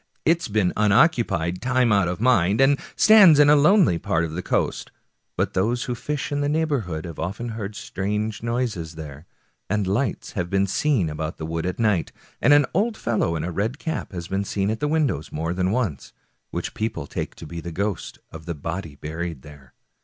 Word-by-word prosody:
It's 165 +1 +2
been 105 -4 +1
unoccu 105 +6 +4
pied 85 +2 -2
time 125 -1 +2
out 100 -3 +3
of 90 +1 -3
mind, 105 -5 +3
and 135 +1 +4 0.2
stands 205 -8 +7
in 145 0 +7
a - - +7
lonely 150 - +4
part 80 +1 0
of 80 - -6
the 85 +3 -4
coast, - - -1 0.5
but - - 0
those 115 +6 0
who 125 - -3
fish 135 +2 -4
in 145 0 0
the 145 - 0
neighborhood 140 - -1
have 85 -3 -8
often 100 +9 -4
heard 105 -2 -5
strange 105 +3 -3
noises 115 -9 -2
there, 75 0 -9 0.4
and 105 0 0
lights 105 +7 -1
have 90 -3 -3
been 100 +1 +2
seen 105 - +1
about 75 +1 -4
the 80 - -5
wood 80 +2 -3
at 90 - -3
night, 105 -7 +1 0.3
and - - +4
an 145 -1 +6
old 220 +5 +1
fellow 105 -8 0
in 80 - -3
a 90 - -3
red 110 - -2
cap 160 +1 -4
has 85 -3 -6
been 95 +2 -1
seen 100 0 -1
at 110 - -3
the 150 - 0
windows 145 - 0
more 80 +3 -2
than 90 0 0
once, 105 - -2 0.4
which - - -4
people 110 -9 -3
take - - -5
to - - -10
be 85 +2 -7
the 85 - -6
ghost 100 0 -3
of 80 +1 -11
the 85 - -3
body 80 +1 -5
buried 80 -1 -5
there. 70 -4 -15
100 Hz, 205 wpm, -23 LUFS, 85-125 Hz, 0.5 s, stands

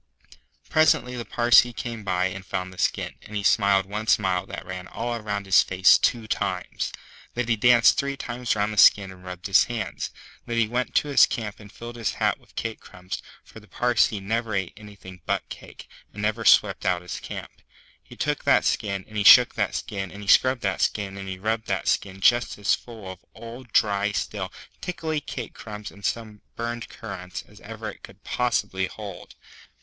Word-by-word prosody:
Presently 125 -5 +3
the 120 -1 -5
Parsee 120 +2 +5
came 115 -2 -6
by 90 -2 0
and 95 +1 -4
found 95 -1 -4
the 95 - -13
skin, - - 0
and 105 - -11
he 100 - -2
smiled 100 -2 +3
one 105 +3 -5
smile 95 -4 +2
that - - -7
ran 90 0 -7
all 120 +1 -4
round 100 -1 -3
his 95 - +6
face 95 0 +5
two 115 -2 +1
times. 100 -4 -2 0.4
Then 125 -1 -1
he 115 - +2
danced 120 +2 +5
three 140 0 -2
times 120 -2 -2
round 105 +1 0
the - - -8
skin 100 -2 +6
and 90 -1 -14
rubbed 90 -1 -8
his 100 - +5
hands. 115 -4 -4 0.4
Then 120 -1 -2
he 115 -2 +3
went 125 +3 -2
to 150 - +2
his 140 - +6
camp 110 -4 -5
and 105 -1 -13
filled 120 +2 -9
his 115 - -1
hat - - 0
with - - -25
cake 115 -1 -4
crumbs, 90 0 -8 0.2
for - - -14
the 105 - -19
Parsee 120 -3 +1
never 110 +2 -2
ate 95 -2 -2
anything 100 -4 -13
but - - -1
cake, - - -11 0.3
and 105 - -6
never 110 +2 -1
swept - - +5
out 90 -1 0
his 90 - -6
camp. - - -9 0.4
He - - -15
took - - -2
that - - +4
skin, 100 -3 -1
and 110 - -8
he 105 - +1
shook 125 +3 +9
that 100 -3 -1
skin, 95 -3 -4
and 100 +1 -9
he - - -11
scrubbed 130 +3 +4
that 100 -2 -1
skin, 100 -2 -1
and 95 0 -7
he 95 - -5
rubbed 110 +3 -2
that - - -2
skin 95 -1 -1
just 120 +4 +3
as 105 0 +2
full 115 -5 -6
of 95 0 -13
old, 120 +1 -10
dry, 105 -1 +2
stale, 100 -2 -3 0.3
tickly 160 -4 -3
cake 120 -5 -7
crumbs 105 -2 -8
and 100 - -16
some 110 -2 -3
burned 120 0 -4
currants 90 -4 -7
as - - -17
ever - - -7
it - - -17
could - - -14
possibly 105 -6 -1
hold. 100 -3 -10
105 Hz, 200 wpm, -25 LUFS, 95-115 Hz, 0.4 s, shook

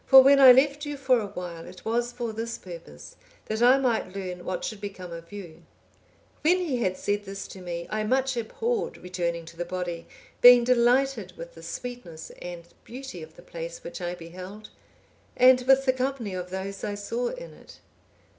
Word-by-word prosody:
For 265 -1 +10
when 275 +1 +6
I 265 -2 +11
left 280 +3 +4
you 290 -1 -4
for 260 -3 +3
awhile, 180 -5 -6
it - - -13
was 235 +2 0
for 240 -2 -4
this 230 +1 -4
purpose, 165 - -11 0.3
that 220 +1 -3
I 250 +2 +7
might 235 -8 0
learn 180 -2 -5
what 185 - -3
should 215 -2 -5
become 190 -3 -7
of 170 +1 -9
you.' 190 -6 -9 0.8
When 345 +4 +4
he 330 -9 -1
had 185 -6 0
said 205 0 -1
this 195 0 -6
to 190 - -10
me, 170 -1 -5
I 215 0 -1
much 260 +3 +1
abhorred 445 - -2
returning 170 -2 -3
to 165 - -12
the 175 - -2
body, 175 -1 -4 0.3
being 245 0 +9
delighted 250 +3 +2
with - - -9
the - - -13
sweetness 245 -11 -7
and 175 -1 -7 0.2
beauty 255 -7 -8
of 160 +1 -11
the 175 - -15
place 170 -1 -7
which 170 - -7
I 175 0 -3
beheld, 185 +5 -10 0.7
and 255 0 +7
with 270 0 +5
the 260 - +4
company 255 -5 -2
of 180 -1 -5
those 190 +1 -5
I 205 -1 -2
saw 230 +4 -2
in - - -7
it. - - -16
215 Hz, 190 wpm, -27 LUFS, 180-255 Hz, 0.8 s, I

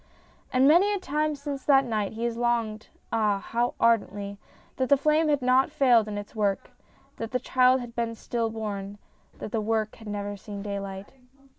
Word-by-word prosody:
And 260 +1 +4
many 350 +7 +5
a - - -3
time 305 -2 -1
since 280 -1 -6
that 270 -2 +5
night 215 -4 -2
has 235 +1 -2
he 230 - -8
longed 230 -3 -1 0.3
(ah! 210 -3 +2
how 235 +4 -2
ardently) 200 -3 +1 0.4
that 260 -1 0
the 280 - +6
flame 305 +3 +2
had 290 -3 +1
not 255 +2 +4
failed 250 -7 +4
in 210 -1 -4
its 205 0 -7
work, 205 -2 -1 0.5
that 225 - -4
the 250 - -1
child 255 0 +3
had 240 -1 -8
been 230 -1 -2
stillborn, 215 -4 -4 0.4
that - - -7
the 225 - 0
book 220 0 -1
had 225 - -12
never 205 0 -4
seen 200 0 -8
daylight. 200 0 -6
230 Hz, 180 wpm, -27 LUFS, 210-260 Hz, 0.5 s, the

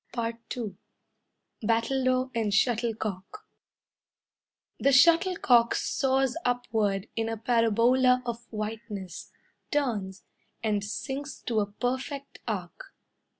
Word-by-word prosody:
II 230 -1 -4 0.8
Battledore 255 +3 +1
and 225 -3 0
Shuttlecock 220 - -1 1.3
The 275 - +3
shuttlecock 285 -5 +5
soars 265 -1 +1
upward 225 -5 0
In 225 0 -1
a 225 - -3
parabola 240 +3 +3
of 235 0 -5
whiteness, 210 -4 -6 0.4
Turns, 215 -10 -1 0.4
And 210 -2 +1
sinks 270 +7 -5
to 230 -3 0
a 205 - 0
perfect 260 +5 -4
arc. - - -5
235 Hz, 90 wpm, -28 LUFS, 215-260 Hz, 1.3 s, shuttlecock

